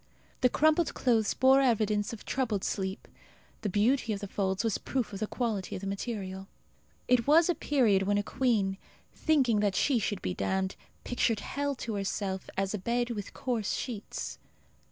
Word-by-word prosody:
The 250 - +5
crumpled 315 +5 +2
clothes 225 -5 +2
bore 265 +1 +5
evidence 215 -5 +2
of 230 - -9
troubled 220 -7 -1
sleep. 190 -1 -3 0.5
The 210 - -1
beauty 225 +4 +2
of 200 - -4
the 200 - -5
folds 190 +1 -1
was 225 -3 0
proof 255 -6 -2
of 195 - -5
the 215 - -1
quality 215 -7 -2
of - - -6
the 195 - -4
material. 195 -2 -4 0.6
It 250 -1 +3
was 320 +4 +6
a - - +4
period 240 - +2
when 205 +1 +1
a 205 - +1
queen, 205 -6 0 0.3
thinking 265 -9 +2
that 205 -2 +1
she 260 +4 +3
should 205 -2 -2
be - - -1
damned, 190 +1 -1 0.3
pictured 230 -3 0
hell 285 0 -2
to 235 -3 -5
herself 195 -1 -3
as 195 +1 0
a 210 - -2
bed 240 +4 0
with 205 -4 -6
coarse 235 -5 -1
sheets. 225 -6 -5
215 Hz, 175 wpm, -30 LUFS, 195-250 Hz, 0.6 s, was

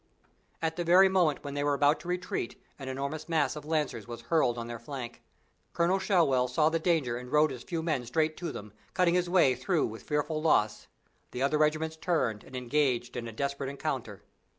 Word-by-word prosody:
At 160 +1 -1
the 175 - 0
very 185 +3 +6
moment 175 -6 +2
when 140 -1 -5
they 145 0 -1
were 145 0 +2
about 145 +2 +3
to 170 - -11
retreat 180 -8 -3 0.2
an 135 - -7
enormous 140 +4 -4
mass 155 -4 +1
of 150 -1 -8
Lancers 150 -9 -1
was 120 -1 -7
hurled 120 -1 +1
on 115 - -4
their 120 0 -6
flank. 130 -4 -7 0.5
Colonel 175 +3 +2
Shewell 160 -10 +3
saw 150 +5 +3
the 165 0 0
danger 160 -9 +1
and 125 0 -9
rode 150 0 +4
his 125 -2 -7
few 165 +4 -4
men 140 -7 -1
straight 155 +4 +1
to 175 - -4
them, 105 0 -9 0.2
cutting 180 -2 +3
his 180 -1 +1
way 175 -8 +5
through 150 +7 0
with 110 0 -7
fearful 150 +1 -1
loss. 110 -9 +2 0.4
The 125 - -3
other 150 +2 +2
regiments 155 +1 +1
turned 155 - 0
and - - -12
engaged 125 -1 0
in 120 -1 -4
a - - -6
desperate 140 +3 -3
encounter. 130 - -4
145 Hz, 205 wpm, -29 LUFS, 125-160 Hz, 0.5 s, very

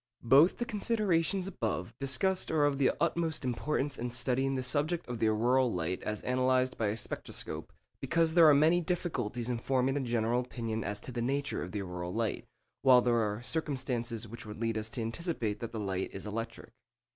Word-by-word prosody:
Both 140 +9 +6
the 240 - -2
considerations 200 -5 0
above 115 - -3
discussed 160 +8 0
are 155 -2 +3
of 140 -1 +1
the 135 - +4
utmost 165 -3 0
importance 135 +3 -1
in 120 +1 -2
studying 130 +3 0
the 130 - -2
subject 150 +6 0
of 120 -2 -4
the 110 - +3
auroral 120 +3 +3
light 90 0 -2
as 105 -1 -4
analysed 130 0 +2
by 110 -2 0
the 105 - -2
spectroscope, 110 - -4 0.3
because 165 -1 +1
there 165 -2 +8
are - - +7
many 160 +5 +4
difficulties 135 - -2
in 120 -2 -1
forming 130 +2 +1
a - - +1
general 120 -1 +1
opinion 115 -3 -4
as 105 0 -3
to - - -8
the 120 -1 -3
nature 140 +3 -1
of 90 - -5
the 100 -2 -3
auroral 90 -1 -5
light, 115 -1 -2 0.3
while 125 -2 +6
there 120 - +2
are 105 +1 -1
circumstances 125 -6 -2
which 115 +2 -8
would 105 - -7
lead 115 -1 0
us 110 0 -2
to 115 - -4
anticipate 115 - -2
that 115 - -5
the 110 - -4
light 95 -2 -2
is 95 - -8
electric. 115 +2 -5
125 Hz, 195 wpm, -31 LUFS, 115-145 Hz, 0.3 s, there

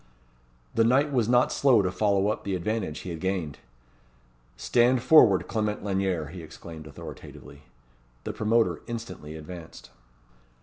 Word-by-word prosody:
The 115 - +3
knight 135 +6 +3
was 120 -4 +1
not 125 0 +4
slow 125 -7 +4
to 90 - -1
follow 100 +1 +1
up 110 - -3
the 100 -2 -2
advantage 95 -3 -3
he 90 - -6
had 80 - -6
gained. 90 -5 -3 1.0
"Stand 120 - +2
forward, 110 - +6
Clement 105 -2 -2
Lanyere," 95 -6 -1
he 90 +1 -9
exclaimed, 80 0 -11
authoritatively. 70 0 -11 0.6
The - - -4
promoter 115 +1 +1
instantly 95 -10 -7
advanced. 80 -2 -10
95 Hz, 135 wpm, -26 LUFS, 80-115 Hz, 1.0 s, forward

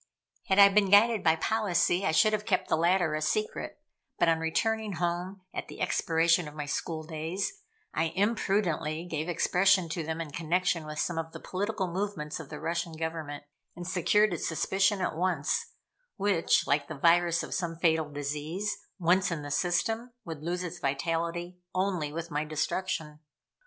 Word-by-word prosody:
Had 190 - +2
I 200 -1 +10
been 200 -1 +3
guided 215 +2 +5
by 160 -1 +5
policy, 195 -1 +1
I - - +3
should 215 +7 +4
have 210 0 -1
kept 185 -3 +1
the - - +4
latter 170 0 +2
a 155 - -1
secret, 215 +8 -2 0.4
but 175 - +3
on 165 -1 +3
returning 215 +6 0
home, 175 +2 -2
at - - -4
the - - -10
expiration 165 0 +2
of 150 - -10
my 150 -1 -4
school 155 +2 -3
days, 170 - -4 0.3
I 165 - +1
imprudently 190 -6 0
gave 160 -1 -3
expression 180 +1 +3
to 165 +2 -2
them 160 +1 -3
in 160 -3 -5
connection 170 0 0
with 150 0 -6
some 165 +1 -1
of 160 0 -5
the - - -7
political 200 +1 -2
movements 175 -5 -3
of 160 - -9
the - - -7
Russian 170 0 -2
Government 160 -2 -4 0.3
and 175 0 -7
secured 195 +3 +3
its 170 - -2
suspicion 195 +4 +1
at 180 - -1
once, 180 - 0 0.5
which, 195 -5 +2
like 145 0 +1
the 155 - -6
virus 170 +2 +3
of - - -6
some 170 -2 -2
fatal 160 -2 +2
disease, 150 +8 -3 0.2
once 185 +1 +3
in 165 -4 -3
the 145 - -6
system, 225 - 0
would 160 -4 -6
lose 175 +3 -2
its 175 0 -6
vitality 170 +5 -2 0.2
only 185 -6 0
with 165 +1 -5
my 150 +1 0
destruction. 155 0 -2
170 Hz, 175 wpm, -29 LUFS, 160-190 Hz, 0.5 s, I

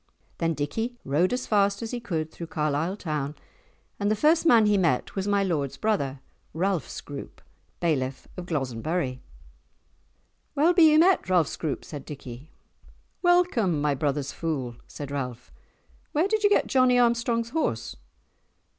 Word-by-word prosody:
Then 165 -1 0
Dickie 225 - -3
rode 150 +7 +2
as 250 +1 -2
fast 200 0 +2
as 225 - -5
he 245 - -3
could 160 -8 -3
through 170 - -8
Carlisle 155 +4 -1
town, 150 -5 -3 0.6
and 205 0 +1
the 215 - +2
first 315 +8 +3
man 230 -7 +6
he 210 0 +3
met 165 -10 +1
was 195 0 -2
my 200 -1 +2
lord's 150 -8 -1
brother, 140 -12 -1 0.3
Ralph 180 -2 0
Scroope, 140 -1 -8 0.4
Bailiff 135 -6 -1
of 180 -1 -7
Glozenburrie. 135 -1 -2 1.4
"Well 315 +5 +4
be 335 -3 +7
ye 305 - +5
met, 355 - +4
Ralph 180 -3 +4
Scroope!" 155 -4 -4
said 145 -3 -7
Dickie. 135 0 -9 0.7
"Welcome, 350 - +3
my 145 0 +1
brother's 140 0 -1
fool!" 135 -8 -3
said 145 -1 -8
Ralph. 125 -4 -5 0.6
"Where 315 +6 +2
did 430 +1 0
ye 410 - +6
get 410 - +3
Johnie 255 -2 +3
Armstrong's 235 -1 +1
horse?" 115 - -2
175 Hz, 150 wpm, -26 LUFS, 145-235 Hz, 1.4 s, be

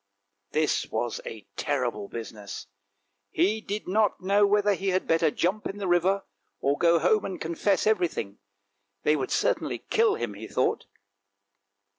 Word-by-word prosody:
This 155 -1 +1
was 120 -1 -2
a 110 -2 -8
terrible 125 -8 -1
business. 110 -3 -7 0.6
He 195 - +1
did 210 0 -4
not 210 +3 +2
know 200 +2 +3
whether 205 0 +3
he 195 +1 -4
had 185 0 +1
better 165 -1 +3
jump 185 +7 -1
into 195 - -6
the 200 -2 -3
river 185 +3 +2 0.4
or 140 +1 +1
go 170 +2 +4
home 180 +6 +3
and 190 - -5
con 165 - -3
fess 195 +3 +1
everything. 175 - 0 0.6
They 150 - +4
would 135 -4 -2
certainly - - 0
kill 450 -1 +4
him, 105 - -3
he 105 +2 -8
thought. - - 0
175 Hz, 155 wpm, -27 LUFS, 140-205 Hz, 0.6 s, go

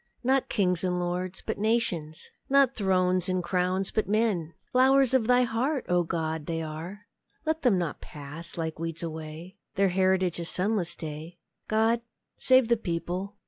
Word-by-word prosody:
Not 265 +1 +2
kings 180 -5 +1
and 180 -1 0
lords, 180 +1 -3
but - - -3
nations! 200 -9 -1 0.2
Not 275 -1 +4
thrones 185 -2 +1
and 185 -1 0
crowns, 185 +2 0
but 215 -3 -1
men! 200 -7 0 0.2
Flowers 265 0 +4
of 245 -4 +3
Thy 250 0 +5
heart, 250 +4 -1
O 175 0 +3
God, 160 -2 -3
are 165 +3 -4
they! 310 - -45
Let 320 0 0
them 245 -8 +3
not 170 -4 -3
pass, 150 +4 -7
like 160 -1 -3
weeds, 165 0 -4
away! 160 +3 -7 0.2
Their 195 -1 +3
heritage 185 -1 +1
a 170 - -3
sunless 185 0 -1
day! 160 +2 -7 0.3
God 225 +2 +2 0.3
save 260 -2 +4
the 235 0 +3
people! 180 +1 -3
185 Hz, 160 wpm, -28 LUFS, 170-225 Hz, 0.3 s, Thy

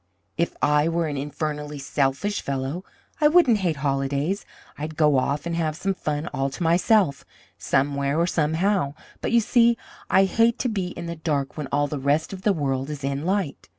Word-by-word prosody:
If 170 - -1
I 150 +2 +3
were 170 0 0
an 150 -2 -3
infernally 150 +1 -4
selfish 140 +8 -1
fellow, 140 +6 -3 0.4
I 300 - +7
wouldn't 295 -9 +5
hate 175 -5 0
holidays. 140 +7 -1 0.3
I'd 155 +1 -6
go 150 -4 +4
off 145 +4 -1
and 170 -1 -2
have 160 -2 -1
some 195 +4 -1
fun 150 -3 -3
all 135 0 0
to 135 - -5
myself, 175 -2 +3 0.4
somewhere 140 +2 0
or 170 - +3
somehow. 165 -1 +1 0.3
But, - - -2
you 235 0 +5
see, 235 +1 +4 0.3
I 190 - +5
hate 230 +5 +2
to 250 - -1
be 195 -5 -2
in 170 -1 -7
the 170 0 -5
dark 145 -4 -2
when 150 -3 -4
all 145 +1 +2
the 145 0 -4
rest 145 +6 0
of 190 - -7
the 210 - +3
world 135 -5 -1
is 145 -2 -6
in 140 +2 -2
light. 190 -6 -2
155 Hz, 190 wpm, -24 LUFS, 140-185 Hz, 0.4 s, I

